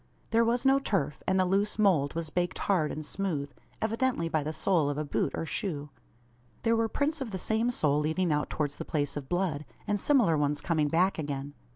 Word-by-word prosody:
There 230 Hz, +1 st, +4 dB
was 240 Hz, +3 st, +1 dB
no 270 Hz, +1 st, +5 dB
turf, 170 Hz, -, -1 dB
and 190 Hz, 0 st, +3 dB
the 185 Hz, -, +4 dB
loose 200 Hz, +3 st, +1 dB
mould 170 Hz, -10 st, +3 dB
was 165 Hz, -2 st, -3 dB
baked 175 Hz, 0 st, -1 dB
hard 175 Hz, -7 st, +1 dB
and 155 Hz, 0 st, -5 dB
smooth, 150 Hz, -7 st, -2 dB, 0.3 s
evidently 225 Hz, -5 st, 0 dB
by 155 Hz, -1 st, +1 dB
the 150 Hz, +2 st, -3 dB
sole 160 Hz, -1 st, +1 dB
of 145 Hz, -, -2 dB
a 150 Hz, -, -2 dB
boot 145 Hz, -, 0 dB
or -, -, -3 dB
shoe. 150 Hz, -5 st, -3 dB, 0.7 s
There 230 Hz, 0 st, +3 dB
were 225 Hz, 0 st, +1 dB
prints 295 Hz, +4 st, -1 dB
of 260 Hz, -, -3 dB
the 190 Hz, -, -4 dB
same 220 Hz, +5 st, +1 dB
sole 150 Hz, -11 st, +2 dB
leading 160 Hz, +2 st, +1 dB
out 150 Hz, 0 st, -1 dB
towards 145 Hz, -2 st, -2 dB
the -, -, -4 dB
place 145 Hz, -2 st, -1 dB
of 140 Hz, -2 st, -6 dB
blood, 175 Hz, -5 st, 0 dB, 0.2 s
and 205 Hz, 0 st, 0 dB
similar 235 Hz, -, +4 dB
ones 145 Hz, 0 st, +1 dB
coming 160 Hz, -4 st, +1 dB
back 175 Hz, +4 st, +2 dB
again. 145 Hz, -1 st, -4 dB
170 Hz, 215 wpm, -29 LUFS, 150-210 Hz, 0.7 s, no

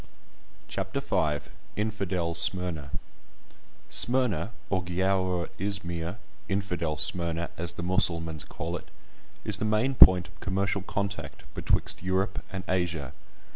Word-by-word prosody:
CHAPTER 95 Hz, +7 st, -3 dB
V—INFIDEL 95 Hz, -, -2 dB
SMYRNA 85 Hz, -4 st, +3 dB, 1.0 s
Smyrna, 115 Hz, -7 st, +2 dB, 0.2 s
or 95 Hz, -1 st, +2 dB
Giaour 90 Hz, -1 st, 0 dB
Izmir, 90 Hz, -2 st, -1 dB, 0.3 s
"Infidel 90 Hz, -6 st, -1 dB
Smyrna," 85 Hz, +1 st, 0 dB
as 85 Hz, 0 st, -2 dB
the 85 Hz, -, -6 dB
Mussulmans 85 Hz, -3 st, +2 dB
call 85 Hz, +2 st, -5 dB
it, -, -, -13 dB, 0.6 s
is 105 Hz, -2 st, +2 dB
the -, -, -3 dB
main 110 Hz, +5 st, +2 dB
point 90 Hz, -8 st, +8 dB
of 85 Hz, -, -20 dB
commercial 95 Hz, +1 st, 0 dB
contact 100 Hz, 0 st, -4 dB
betwixt -, -, 0 dB
Europe 95 Hz, +2 st, 0 dB
and 95 Hz, -1 st, -4 dB
Asia. 85 Hz, -7 st, -1 dB
90 Hz, 110 wpm, -28 LUFS, 85-100 Hz, 1.0 s, point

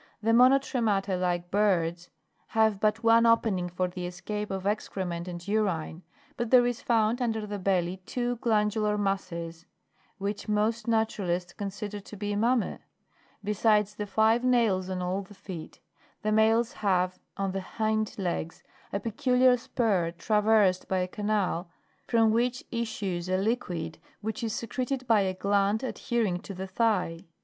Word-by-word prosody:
The 225 Hz, -, +3 dB
monotremata, 235 Hz, -6 st, +3 dB
like 175 Hz, -1 st, -1 dB
birds, 180 Hz, -4 st, +1 dB, 0.5 s
have 220 Hz, -2 st, +4 dB
but 215 Hz, +2 st, +1 dB
one 230 Hz, 0 st, +6 dB
opening 205 Hz, -6 st, +2 dB
for 180 Hz, +1 st, -1 dB
the 180 Hz, 0 st, -5 dB
escape 205 Hz, +4 st, -5 dB
of 190 Hz, -1 st, -4 dB
excrement 185 Hz, -4 st, -2 dB
and 175 Hz, 0 st, -7 dB
urine; 185 Hz, -6 st, -1 dB, 0.3 s
but 235 Hz, -1 st, -2 dB
there 245 Hz, -1 st, +6 dB
is 245 Hz, -1 st, -1 dB
found 230 Hz, +1 st, +2 dB
under 225 Hz, -3 st, -1 dB
the 205 Hz, -1 st, -5 dB
belly 185 Hz, -1 st, 0 dB
two 245 Hz, -1 st, -1 dB
glandular 210 Hz, -2 st, +1 dB
masses, 170 Hz, -4 st, -3 dB, 0.5 s
which 205 Hz, +1 st, -4 dB
most 215 Hz, +2 st, 0 dB
naturalists 195 Hz, -6 st, 0 dB
consider 205 Hz, 0 st, -5 dB
to 205 Hz, +1 st, -11 dB
be 205 Hz, +1 st, -2 dB
mammas; 235 Hz, +2 st, +1 dB, 0.6 s
besides 210 Hz, 0 st, +2 dB
the 210 Hz, 0 st, -5 dB
five 220 Hz, +4 st, +3 dB
nails 225 Hz, -7 st, +2 dB
on 185 Hz, -1 st, -2 dB
all 185 Hz, +2 st, -1 dB
the 200 Hz, +1 st, -13 dB
feet, 185 Hz, -4 st, -9 dB, 0.4 s
the 215 Hz, -, +1 dB
males 225 Hz, +2 st, +3 dB
have 185 Hz, -5 st, 0 dB, 0.2 s
on 195 Hz, -1 st, -1 dB
the 195 Hz, 0 st, -3 dB
hind 215 Hz, +2 st, -1 dB
legs 175 Hz, -3 st, -3 dB, 0.3 s
a 200 Hz, -, -1 dB
peculiar 250 Hz, +4 st, +3 dB
spur 220 Hz, -8 st, 0 dB
traversed 210 Hz, -3 st, +3 dB
by 190 Hz, -, 0 dB
a 180 Hz, 0 st, 0 dB
canal 200 Hz, -3 st, -1 dB, 0.4 s
from 225 Hz, -2 st, +4 dB
which 245 Hz, +2 st, 0 dB
issues 195 Hz, -7 st, -3 dB
a 185 Hz, -, +2 dB
liquid, 180 Hz, -7 st, -2 dB, 0.2 s
which 220 Hz, +4 st, -4 dB
is 225 Hz, -, -1 dB
secreted 255 Hz, +4 st, -3 dB
by 225 Hz, -4 st, +4 dB
a 190 Hz, -1 st, -1 dB
gland 200 Hz, +3 st, +1 dB
adhering 230 Hz, -7 st, -1 dB
to 195 Hz, -, -9 dB
the 190 Hz, +1 st, -4 dB
thigh. 190 Hz, -4 st, 0 dB
210 Hz, 150 wpm, -28 LUFS, 185-225 Hz, 0.6 s, one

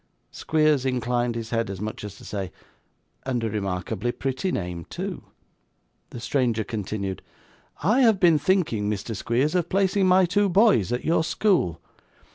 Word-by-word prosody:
Squeers 155 Hz, -3 st, +2 dB
inclined 120 Hz, -2 st, 0 dB
his 115 Hz, -1 st, -5 dB
head 115 Hz, -2 st, 0 dB
as 95 Hz, -2 st, -5 dB
much 105 Hz, 0 st, -5 dB
as 105 Hz, -1 st, -7 dB
to -, -, -14 dB
say, 95 Hz, -4 st, -4 dB, 0.7 s
'And 125 Hz, -3 st, -2 dB
a 110 Hz, -, -1 dB
remarkably 100 Hz, +3 st, -2 dB
pretty 135 Hz, +9 st, -2 dB
name, 90 Hz, -, -4 dB
too.' -, -, -6 dB, 0.8 s
The -, -, -8 dB
stranger 120 Hz, -3 st, 0 dB
continued. 100 Hz, -2 st, -4 dB, 0.6 s
'I 215 Hz, -, +3 dB
have 225 Hz, -6 st, +4 dB
been 170 Hz, -5 st, +5 dB
thinking, 145 Hz, -, +1 dB
Mr. 105 Hz, +2 st, -3 dB
Squeers, 125 Hz, -, 0 dB
of 175 Hz, -2 st, 0 dB
placing 195 Hz, 0 st, +2 dB
my 185 Hz, 0 st, +5 dB
two 200 Hz, +3 st, +2 dB
boys 190 Hz, -, +4 dB
at 125 Hz, -, -2 dB
your 160 Hz, 0 st, +2 dB
school. 160 Hz, -, +1 dB
120 Hz, 155 wpm, -25 LUFS, 105-175 Hz, 0.8 s, been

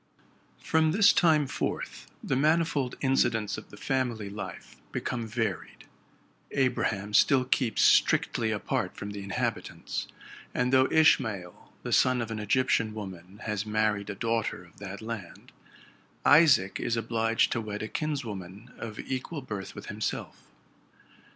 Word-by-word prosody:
From 160 Hz, -1 st, +2 dB
this 205 Hz, +1 st, +6 dB
time 155 Hz, -4 st, +4 dB
forth -, -, -4 dB
the 135 Hz, -, 0 dB
manifold 150 Hz, -2 st, +1 dB
incidents 120 Hz, -5 st, +1 dB
of -, -, -10 dB
the 105 Hz, -, -13 dB
family 120 Hz, -7 st, -2 dB
life 100 Hz, -2 st, -8 dB
become 120 Hz, -2 st, -3 dB
varied. 110 Hz, -5 st, -3 dB, 0.6 s
Abraham 105 Hz, -6 st, 0 dB
still 130 Hz, +4 st, +5 dB
keeps 125 Hz, -3 st, +1 dB
strictly 115 Hz, -2 st, +3 dB
apart 105 Hz, -3 st, -2 dB
from 105 Hz, 0 st, -5 dB
the 100 Hz, -1 st, -6 dB
inhabitants; 100 Hz, 0 st, -3 dB, 0.5 s
and 125 Hz, +1 st, +1 dB
though 130 Hz, 0 st, +6 dB
Ishmael, 110 Hz, -, +2 dB
the -, -, -2 dB
son 130 Hz, -1 st, +4 dB
of 115 Hz, -1 st, -3 dB
an 110 Hz, -, -3 dB
Egyptian 110 Hz, 0 st, +1 dB
woman, 95 Hz, -2 st, -9 dB
has 105 Hz, -1 st, -2 dB
married 105 Hz, -1 st, 0 dB
a 105 Hz, -, -4 dB
daughter 115 Hz, -2 st, -1 dB
of 85 Hz, -, -20 dB
that 100 Hz, +1 st, -7 dB
land, 110 Hz, -6 st, -7 dB, 0.7 s
Isaac 145 Hz, -, +5 dB
is 115 Hz, -, -1 dB
obliged 115 Hz, 0 st, +1 dB
to 115 Hz, -, 0 dB
wed 105 Hz, -1 st, -5 dB
a -, -, -3 dB
kinswoman 110 Hz, -, -5 dB
of 110 Hz, -2 st, -6 dB
equal 135 Hz, +3 st, -4 dB
birth 105 Hz, -6 st, -6 dB
with -, -, -8 dB
himself. -, -, -5 dB
115 Hz, 140 wpm, -28 LUFS, 105-130 Hz, 0.7 s, this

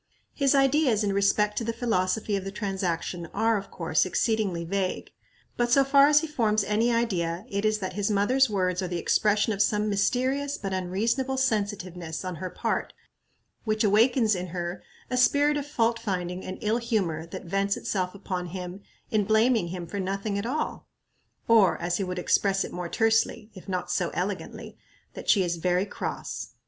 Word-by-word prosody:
His 280 Hz, -1 st, +2 dB
ideas 270 Hz, -5 st, +3 dB
in 200 Hz, -1 st, 0 dB
respect 205 Hz, +1 st, +2 dB
to -, -, -4 dB
the 230 Hz, -, -1 dB
philosophy 215 Hz, -3 st, 0 dB
of 195 Hz, -, -2 dB
the 195 Hz, -, -5 dB
transaction 185 Hz, -4 st, -3 dB
are, 225 Hz, +2 st, +2 dB
of 195 Hz, -1 st, -4 dB
course, 160 Hz, -3 st, +1 dB
exceedingly 190 Hz, -3 st, 0 dB
vague; 190 Hz, +1 st, -2 dB, 0.5 s
but 240 Hz, 0 st, +1 dB
so 275 Hz, +2 st, +6 dB
far 275 Hz, +1 st, +6 dB
as 300 Hz, 0 st, +5 dB
he 320 Hz, -, -3 dB
forms 220 Hz, -8 st, +1 dB
any 215 Hz, +4 st, +1 dB
idea, 185 Hz, -6 st, -1 dB
it 200 Hz, 0 st, -2 dB
is 215 Hz, 0 st, +2 dB
that 185 Hz, -3 st, -4 dB
his 205 Hz, +2 st, -1 dB
mother's 245 Hz, +6 st, +3 dB
words 185 Hz, -2 st, 0 dB
are 185 Hz, -, -2 dB
the 175 Hz, 0 st, -3 dB
expression 210 Hz, +5 st, +2 dB
of 200 Hz, -, -1 dB
some 210 Hz, 0 st, +2 dB
mysterious 260 Hz, +8 st, 0 dB
but 195 Hz, -1 st, -4 dB
unreasonable 225 Hz, +9 st, -1 dB
sensitiveness 195 Hz, -9 st, -2 dB
on 180 Hz, -2 st, -4 dB
her 185 Hz, +2 st, -4 dB
part, -, -, -2 dB, 0.7 s
which 215 Hz, -1 st, 0 dB
awakens 220 Hz, +2 st, +4 dB
in 180 Hz, -1 st, -3 dB
her 175 Hz, +1 st, -4 dB, 0.3 s
a 250 Hz, -, 0 dB
spirit 285 Hz, +4 st, +4 dB
of 290 Hz, -1 st, -3 dB
fault 230 Hz, -5 st, +1 dB
finding 180 Hz, -4 st, -3 dB
and 185 Hz, -, -6 dB
ill 215 Hz, +2 st, +1 dB
humor 195 Hz, -10 st, -1 dB
that 170 Hz, -, -8 dB
vents 195 Hz, +3 st, 0 dB
itself 185 Hz, -1 st, -2 dB
upon 185 Hz, -2 st, -4 dB
him 180 Hz, +2 st, -7 dB, 0.3 s
in 215 Hz, -2 st, +2 dB
blaming 220 Hz, -1 st, +3 dB
him 175 Hz, 0 st, -5 dB
for 200 Hz, +4 st, -5 dB
nothing 195 Hz, +2 st, -2 dB
at 200 Hz, +3 st, -2 dB
all; 305 Hz, +5 st, -3 dB, 0.6 s
or, 225 Hz, -4 st, +5 dB
as 175 Hz, 0 st, -1 dB
he 200 Hz, -, -1 dB
would 180 Hz, -1 st, -4 dB
express 195 Hz, +2 st, +2 dB
it -, -, -7 dB
more 175 Hz, -1 st, -4 dB
tersely, 225 Hz, 0 st, +1 dB
if 190 Hz, 0 st, -12 dB
not 185 Hz, -1 st, -2 dB
so -, -, 0 dB
elegantly, -, -, -4 dB, 0.4 s
that -, -, -7 dB
she 195 Hz, -, +5 dB
is 175 Hz, -1 st, -1 dB
"very 180 Hz, +3 st, +1 dB
cross." -, -, -5 dB
200 Hz, 185 wpm, -27 LUFS, 185-230 Hz, 0.7 s, so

